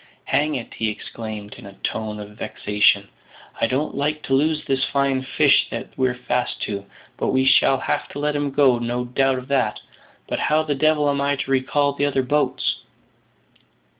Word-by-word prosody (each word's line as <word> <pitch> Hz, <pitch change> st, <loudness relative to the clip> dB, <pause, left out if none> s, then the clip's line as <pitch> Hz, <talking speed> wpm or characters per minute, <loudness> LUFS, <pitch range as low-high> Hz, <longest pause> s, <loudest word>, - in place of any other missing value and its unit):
"Hang 150 Hz, +3 st, +1 dB
it!" 120 Hz, -, -6 dB
he 110 Hz, -, -1 dB
exclaimed, 105 Hz, -1 st, -7 dB
in 115 Hz, -, -11 dB
a 100 Hz, -, -11 dB
tone 110 Hz, -1 st, -3 dB
of 105 Hz, 0 st, -8 dB
vexation; 105 Hz, -1 st, +1 dB, 0.5 s
"I -, -, +3 dB
don't 135 Hz, +5 st, -1 dB
like 150 Hz, +2 st, -1 dB
to 135 Hz, -, -2 dB
lose 150 Hz, +3 st, +2 dB
this 135 Hz, -1 st, 0 dB
fine 140 Hz, -1 st, +1 dB
fish 130 Hz, -, +3 dB
that -, -, -5 dB
we're 130 Hz, -1 st, +1 dB
fast 125 Hz, 0 st, -2 dB
to; 100 Hz, -1 st, -4 dB, 0.3 s
but -, -, -1 dB
we 130 Hz, 0 st, +2 dB
shall 135 Hz, 0 st, +5 dB
have -, -, -2 dB
to -, -, -9 dB
let 150 Hz, 0 st, 0 dB
him 145 Hz, -1 st, 0 dB
go, 135 Hz, -3 st, +4 dB
no 120 Hz, +1 st, -2 dB
doubt 135 Hz, +1 st, +1 dB
of 130 Hz, 0 st, -7 dB
that; 130 Hz, -6 st, +1 dB, 0.5 s
but -, -, -2 dB
how 155 Hz, +1 st, +2 dB
the 150 Hz, -2 st, -1 dB
devil 150 Hz, +1 st, +2 dB
am 140 Hz, -1 st, +1 dB
I 140 Hz, 0 st, +1 dB
to 135 Hz, -, -4 dB
recall 140 Hz, +2 st, +2 dB
the 145 Hz, +1 st, 0 dB
other 135 Hz, -2 st, +1 dB
boats?" 145 Hz, +4 st, 0 dB
135 Hz, 190 wpm, -22 LUFS, 120-145 Hz, 0.5 s, shall